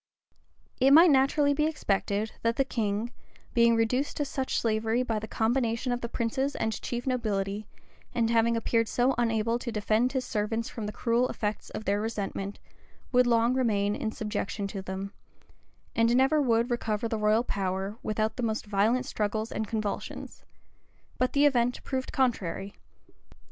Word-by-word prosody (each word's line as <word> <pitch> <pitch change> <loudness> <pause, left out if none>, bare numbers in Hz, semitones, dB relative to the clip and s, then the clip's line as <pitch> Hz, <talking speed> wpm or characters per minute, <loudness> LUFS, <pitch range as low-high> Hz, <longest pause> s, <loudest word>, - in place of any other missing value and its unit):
} - - -45 0.3
It 270 +2 +5
might 330 +2 +8
naturally 285 +2 +3
be 300 +2 +1
expected, 210 -7 -1
that 230 0 +1
the 270 - +2
king, 220 -1 -2 0.4
being 235 0 +5
reduced 250 +5 0
to 290 - 0
such 265 -1 -2
slavery 225 +2 +1
by 225 -3 -1
the 220 - -7
combination 230 +2 0
of 245 0 -1
the 235 - -4
princes 265 +5 -1
and 220 0 -2
chief 240 0 -4
nobility, 210 -5 -1 0.4
and 235 -2 +1
having 230 0 +3
appeared 230 0 +1
so 250 +4 +2
unable 230 0 +1
to 240 - -4
defend 220 +3 +1
his 260 -2 -1
servants 225 +2 -2
from 220 -3 -5
the - - -3
cruel 235 +3 +1
effects 210 0 -3
of 215 - -7
their 200 +1 +1
resentment, 205 -2 -3 0.5
would 250 -1 +4
long 235 +1 +3
remain 210 -5 +1
in 220 - -2
subjection 210 -2 -3
to 195 -1 -5
them; 190 +2 -5 0.8
and 230 +1 +3
never 270 +4 +4
would 235 -2 +2
recover 230 -1 -1
the 225 -1 -2
royal 215 +2 +3
power, 195 0 -3
without 215 0 -1
the - - -2
most 220 -1 -1
violent 215 +5 +1
struggles 215 0 -2
and 220 - -3
convulsions: 215 -1 -4 0.8
but 255 0 +1
the 285 +1 +4
event 245 -3 +2
proved 260 -1 -3
contrary. 200 -7 -1
230 Hz, 165 wpm, -28 LUFS, 210-250 Hz, 0.8 s, might